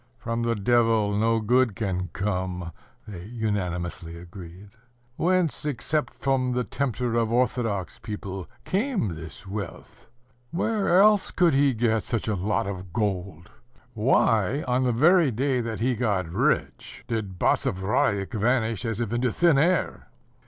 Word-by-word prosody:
"From 115 -1 -3
the 115 0 0
Devil 110 -1 +2
no 115 +2 +2
good 120 0 +2
can 90 -4 -2
come," 90 -3 -3 0.4
they 90 -5 -8
unanimously 90 -7 -3
agreed. 90 +2 -11 0.4
"Whence, 180 0 +1
except 150 +2 -2
from 130 -2 0
the 125 0 0
tempter 125 -1 -2
of 115 -1 +1
orthodox 115 -7 0
people, 100 -3 -6 0.2
came 210 - 0
this 80 +4 -10
wealth? 100 +1 -7 0.4
Where 195 - +1
else 205 0 +5
could 175 -4 +3
he 135 -1 +3
get 110 -1 +1
such 115 +2 -3
a 110 - +1
lot 100 +1 0
of 95 -2 -6
gold? 95 -4 -3 0.4
Why, 115 +2 +2
on 125 +1 +1
the 125 - +2
very 160 +6 +4
day 130 +2 0
that 115 -2 -4
he 125 +2 +2
got 105 -7 0
rich, 85 +4 -1
did 105 -5 -3
Basavriuk 95 +3 +1
vanish 115 -1 0
as 115 -1 -2
if 115 -1 -2
into 120 0 +1
thin 165 +1 +3
air?" 175 +5 +1
115 Hz, 140 wpm, -25 LUFS, 100-130 Hz, 0.4 s, else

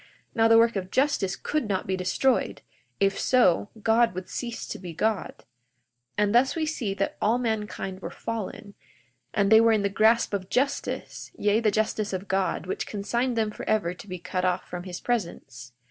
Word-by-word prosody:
Now 225 -1 +4
the 225 0 +6
work 230 0 +4
of 185 -2 -3
justice 235 -7 +1
could 295 +4 -2
not 190 -2 -1
be 190 - -1
destroyed; 185 +8 0 0.4
if 195 0 +2
so, 205 -6 +3
God 230 -2 +3
would 185 0 -6
cease 235 -2 -5
to - - -5
be 175 -3 -8
God. 215 +1 0
42:14 - - -22 0.7
And 210 0 +2
thus 255 +3 +4
we 320 -1 0
see 245 -11 -2
that 195 0 -2
all 225 +3 +3
mankind 210 -5 -3
were 170 - -5
fallen, 210 0 -6 0.6
and 200 0 +1
they 220 0 +8
were 230 0 +5
in 210 -2 +1
the 200 - +1
grasp 220 +3 +3
of 190 -2 -3
justice; 275 +2 -2
yea, 210 +1 +2
the 225 -2 +2
justice 215 0 -1
of 190 +2 -4
God, 190 -1 0
which 185 - -3
consigned 235 +4 -1
them 215 -1 +1
forever 210 -4 -1
to 180 - -13
be 185 -1 -5
cut 180 +1 -3
off 180 0 0
from 180 0 -6
his 180 -1 -6
presence. 155 - -4
210 Hz, 190 wpm, -26 LUFS, 190-230 Hz, 0.7 s, they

